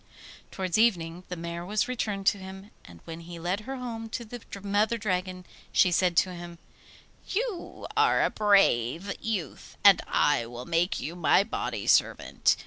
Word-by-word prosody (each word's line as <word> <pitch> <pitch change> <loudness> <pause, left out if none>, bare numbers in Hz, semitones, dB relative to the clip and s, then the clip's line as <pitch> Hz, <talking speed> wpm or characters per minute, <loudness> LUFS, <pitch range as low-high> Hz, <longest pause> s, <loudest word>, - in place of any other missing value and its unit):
Towards 185 0 -1
evening 180 -6 +1
the 180 - -4
mare 170 0 -5
was 205 +4 0
returned 210 -6 -3
to 200 - +3
him, 190 +2 -10
and 85 -1 -15
when 165 0 -7
he 170 0 -9
led 175 +4 -2
her 265 +5 -6
home 230 -3 -6
to 235 +1 -5
the 240 +2 -9 0.2
Mother 205 +3 +1
Dragon 185 -3 -3 0.3
she 180 - +4
said 175 -1 +2
to 185 - +3
him: 175 -1 -9 0.7
'You 430 -3 -4
are - - +4
a - - +1
brave 195 - +2
youth, 210 -7 -4
and 200 -2 +7
I 120 -6 +2
will 120 +1 -8
make 170 +2 0
you 165 - -5
my 180 +2 +4
body 225 - -4
servant. - - +2
190 Hz, 165 wpm, -27 LUFS, 170-215 Hz, 0.7 s, and